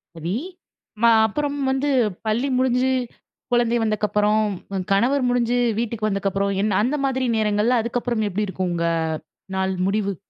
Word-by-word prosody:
சரி. 165 Hz, +2 st, -4 dB, 0.7 s
ம -, -, +4 dB, 0.2 s
அப்புறம் 285 Hz, +6 st, -2 dB
வந்து 270 Hz, +2 st, 0 dB, 0.4 s
பள்ளி 225 Hz, +5 st, 0 dB
முடிஞ்சு, 255 Hz, 0 st, +2 dB, 0.6 s
குழந்தை 240 Hz, -1 st, +2 dB
வந்தக்கப்புறம், 210 Hz, 0 st, +1 dB, 0.5 s
கணவர் 250 Hz, +7 st, +3 dB
முடிஞ்சு 245 Hz, 0 st, +1 dB, 0.2 s
வீட்டுக்கு 230 Hz, -2 st, -2 dB
வந்தக்கப்புறம், 195 Hz, 0 st, -1 dB
என்ன 205 Hz, -2 st, +1 dB
அந்த 260 Hz, +6 st, 0 dB
மாதிரி 260 Hz, -1 st, 0 dB
நேரங்கள்ல 215 Hz, +3 st, +2 dB
அதுக்கப்புறம் 235 Hz, -1 st, -1 dB
எப்பிடி 205 Hz, +2 st, -1 dB
இருக்கும், 185 Hz, -1 st, -2 dB
உங்க 170 Hz, 0 st, -1 dB, 0.7 s
நாள் 190 Hz, 0 st, 0 dB
முடிவு? 200 Hz, -1 st, 0 dB
220 Hz, 130 wpm, -22 LUFS, 200-245 Hz, 0.7 s, ம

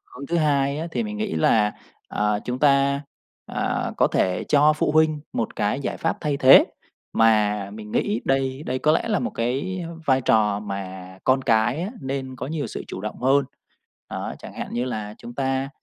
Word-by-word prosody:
Hướng 140 Hz, +2 st, -7 dB
thứ 170 Hz, -, 0 dB
hai 140 Hz, -2 st, +1 dB
á, 165 Hz, -, -3 dB
thì 230 Hz, -, -1 dB
mình 215 Hz, -1 st, -5 dB
nghĩ 215 Hz, -2 st, -2 dB
là, 110 Hz, -9 st, +3 dB, 0.3 s
à, 105 Hz, 0 st, 0 dB
chúng 125 Hz, +1 st, -3 dB
ta, 140 Hz, -1 st, +3 dB, 0.4 s
à, -, -, -2 dB
có -, -, +4 dB
thể 90 Hz, -1 st, 0 dB
cho 150 Hz, +1 st, +4 dB
phụ 150 Hz, -, 0 dB
huynh 155 Hz, -1 st, +3 dB
một 115 Hz, -, -2 dB
cái 105 Hz, +6 st, 0 dB
giải -, -, -3 dB
pháp 165 Hz, -, -1 dB
thay 150 Hz, -3 st, 0 dB
thế, 135 Hz, -1 st, +8 dB, 0.5 s
mà 105 Hz, -3 st, +3 dB
mình 105 Hz, 0 st, -9 dB
nghĩ 210 Hz, +1 st, 0 dB
đây 135 Hz, +1 st, 0 dB
đây 130 Hz, +1 st, -1 dB
có 150 Hz, +4 st, +3 dB
lẽ -, -, 0 dB
là 215 Hz, -, +2 dB
một 245 Hz, -, -2 dB
cái 140 Hz, +10 st, -2 dB, 0.2 s
vai 135 Hz, -2 st, +3 dB
trò 105 Hz, -4 st, +2 dB
mà 95 Hz, -2 st, -7 dB
con 130 Hz, +1 st, +3 dB
cái 115 Hz, +5 st, +2 dB
á 190 Hz, -, -3 dB
nên 135 Hz, -1 st, -4 dB
có -, -, -5 dB
nhiều 155 Hz, 0 st, -3 dB
sự -, -, -6 dB
chủ 95 Hz, -, -6 dB
động 105 Hz, +3 st, -6 dB
hơn. 135 Hz, +2 st, +3 dB, 0.6 s
Đó, -, -, -4 dB
chẳng -, -, -10 dB
hạn -, -, -5 dB
như 120 Hz, +1 st, -1 dB
là 110 Hz, -4 st, -4 dB
chúng 120 Hz, -, -10 dB
ta, 135 Hz, 0 st, -1 dB
130 Hz, 200 wpm, -23 LUFS, 110-150 Hz, 0.6 s, thế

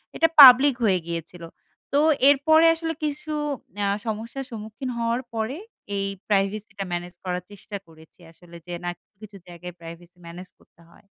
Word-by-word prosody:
এটা 330 Hz, -, +4 dB
পাবলিক 265 Hz, +1 st, +9 dB
হয়ে 190 Hz, -5 st, +3 dB
গিয়েছিল। 170 Hz, +1 st, -6 dB, 0.5 s
তো 285 Hz, -, +4 dB, 0.3 s
এরপরে 315 Hz, +3 st, +4 dB
আসলে 325 Hz, 0 st, -4 dB
কিছু 300 Hz, +1 st, -4 dB, 0.5 s
অ্যা 205 Hz, -, 0 dB, 0.2 s
সমস্যা 225 Hz, +5 st, -4 dB
সম্মুখীন 220 Hz, +4 st, -7 dB
হওয়ার 235 Hz, +2 st, -1 dB
পরে 225 Hz, +5 st, -3 dB, 0.4 s
এই 195 Hz, 0 st, -1 dB, 0.2 s
প্রাইভেসিটা 200 Hz, 0 st, -1 dB
ম্যানেজ 175 Hz, +1 st, -4 dB
করার 180 Hz, -1 st, -3 dB
চেষ্টা 205 Hz, +1 st, -8 dB
করেছি। 160 Hz, +1 st, -20 dB
আসলে 170 Hz, +1 st, -17 dB
যে, 175 Hz, -, -6 dB
না -, -, -1 dB
কিছু, -, -, -82 dB
কিছু 210 Hz, -2 st, -11 dB
জায়গায় 175 Hz, 0 st, -10 dB
প্রাইভেসি 170 Hz, +1 st, -12 dB
ম্যানেজ 175 Hz, +2 st, -10 dB
করতে 170 Hz, -, -26 dB
হয়। 170 Hz, -, -22 dB
205 Hz, 155 wpm, -24 LUFS, 175-250 Hz, 0.5 s, পাবলিক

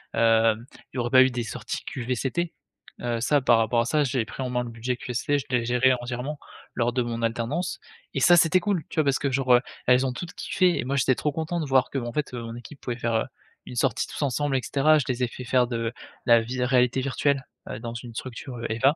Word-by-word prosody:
Hem, 115 Hz, 0 st, +3 dB, 0.3 s
il -, -, -6 dB
y -, -, 0 dB
aurait 120 Hz, 0 st, -1 dB
pas 130 Hz, 0 st, +8 dB
eu 130 Hz, -, +3 dB
des 120 Hz, -1 st, -2 dB
sorties 115 Hz, -, -5 dB
QVCT. 130 Hz, +7 st, -2 dB, 0.5 s
Heu, 120 Hz, -1 st, -2 dB
ça, 145 Hz, +4 st, +3 dB
par 120 Hz, -3 st, +4 dB
rapport 115 Hz, +1 st, +2 dB
à -, -, -1 dB
ça, 150 Hz, +4 st, +2 dB
j'ai 125 Hz, -3 st, 0 dB
pris 110 Hz, -, -8 dB
en 125 Hz, -, -3 dB
main 125 Hz, 0 st, 0 dB
le 120 Hz, -, -6 dB
budget 120 Hz, +2 st, -3 dB
QST, 130 Hz, +5 st, -1 dB
je -, -, -7 dB
l'ai 120 Hz, -2 st, +2 dB
géré 125 Hz, +2 st, +4 dB
entièrement 125 Hz, +4 st, -4 dB, 0.4 s
lors 120 Hz, 0 st, +1 dB
de 125 Hz, -2 st, +1 dB
mon 115 Hz, -1 st, -4 dB
alternance 120 Hz, -, -2 dB, 0.4 s
et -, -, +1 dB
ça 175 Hz, -, +7 dB
c'était 170 Hz, +3 st, +5 dB
cool, 185 Hz, -3 st, 0 dB
tu -, -, -9 dB
vois? 155 Hz, -, +3 dB
Parce 140 Hz, -1 st, +2 dB
que, 140 Hz, -2 st, -1 dB
genre, 130 Hz, -2 st, +4 dB, 0.3 s
elles 125 Hz, +1 st, +5 dB
ont 130 Hz, -, 0 dB
toutes 175 Hz, +8 st, -7 dB
kiffé 185 Hz, -3 st, +1 dB
et -, -, -1 dB
moi 140 Hz, +2 st, -1 dB
j'étais 130 Hz, -1 st, +3 dB
trop 150 Hz, -, -1 dB
content 160 Hz, +3 st, -2 dB
de 155 Hz, -, -2 dB
voir, 130 Hz, -1 st, +3 dB
qu'en 120 Hz, -3 st, -3 dB
fait 150 Hz, -3 st, -2 dB
que 125 Hz, -, -6 dB
mon 115 Hz, 0 st, -6 dB
équipe 120 Hz, +4 st, -11 dB
pouvait 120 Hz, -2 st, -4 dB
faire, 115 Hz, -1 st, 0 dB
heu, 110 Hz, -, +1 dB, 0.4 s
une -, -, -8 dB
sortie -, -, +1 dB
tous -, -, -7 dB
ensemble, 140 Hz, +1 st, 0 dB
et -, -, -1 dB
cetera. 155 Hz, +3 st, +4 dB
Je 130 Hz, -, -2 dB
les 125 Hz, 0 st, 0 dB
ai -, -, +2 dB
fait 125 Hz, -, -8 dB
faire 125 Hz, 0 st, +3 dB
de 115 Hz, -1 st, -2 dB, 0.3 s
la 115 Hz, -1 st, +6 dB
vie 125 Hz, +2 st, -3 dB
réalité 125 Hz, 0 st, +3 dB
virtuelle, 140 Hz, +1 st, 0 dB, 0.2 s
heu, 105 Hz, -, -5 dB
dans 115 Hz, 0 st, -6 dB
une 115 Hz, -1 st, -8 dB
structure 125 Hz, 0 st, -6 dB
EVA 135 Hz, +7 st, +3 dB
125 Hz, 250 wpm, -25 LUFS, 120-140 Hz, 0.5 s, pas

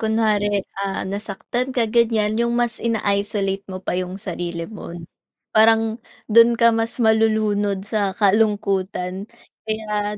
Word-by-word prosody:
kunwari, 210 Hz, -3 st, +1 dB, 0.2 s
ah, 195 Hz, -1 st, -2 dB
nasaktan 205 Hz, +5 st, -4 dB
ka 240 Hz, -3 st, +2 dB
ganyan 220 Hz, -1 st, +1 dB
yung 235 Hz, 0 st, +1 dB
mas 240 Hz, -1 st, -1 dB
ina-isolate 200 Hz, -3 st, -1 dB
mo 185 Hz, -, -5 dB
pa -, -, -2 dB
yung 180 Hz, +1 st, -3 dB
sarili 175 Hz, -3 st, -5 dB
mo. 175 Hz, -3 st, -9 dB, 0.6 s
Parang 225 Hz, 0 st, +4 dB, 0.3 s
dun 230 Hz, +1 st, +5 dB
ka 235 Hz, -1 st, +5 dB
mas 225 Hz, +2 st, -2 dB
malulunod 215 Hz, -3 st, +1 dB
sa 205 Hz, -3 st, 0 dB
kalungkutan, 200 Hz, -3 st, +1 dB, 0.4 s
kaya 210 Hz, -1 st, -3 dB
210 Hz, 125 wpm, -21 LUFS, 195-225 Hz, 0.6 s, dun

